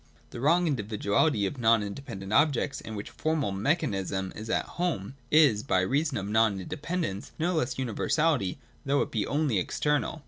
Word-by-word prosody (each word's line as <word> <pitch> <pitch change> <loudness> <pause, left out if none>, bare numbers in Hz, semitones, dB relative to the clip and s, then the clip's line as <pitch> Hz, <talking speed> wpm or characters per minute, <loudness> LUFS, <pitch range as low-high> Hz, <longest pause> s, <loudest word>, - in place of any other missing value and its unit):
The - - -7
wrong 170 +6 +4
individuality 105 -2 +1
of 125 +7 -4
non 115 -2 +4
independent 100 -2 -6
objects, 145 0 +2
in 110 - -7
which 100 - -6
formal 155 -9 -1
Mechanism 95 - -1
is 110 +1 -7
at - - +1
home, 160 - -3 0.2
is, 145 -9 +5
by 95 -7 +1
reason 140 +7 0
of 95 - -3
that 100 - -5
non 110 -3 +3
independence, 150 - -4
no 175 +3 0
less 125 -6 -1
universality, 130 - 0 0.3
though 140 0 +2
it - - -8
be 110 -4 -1
only 145 -8 +1
external. 150 - -1
120 Hz, 170 wpm, -28 LUFS, 100-150 Hz, 0.3 s, is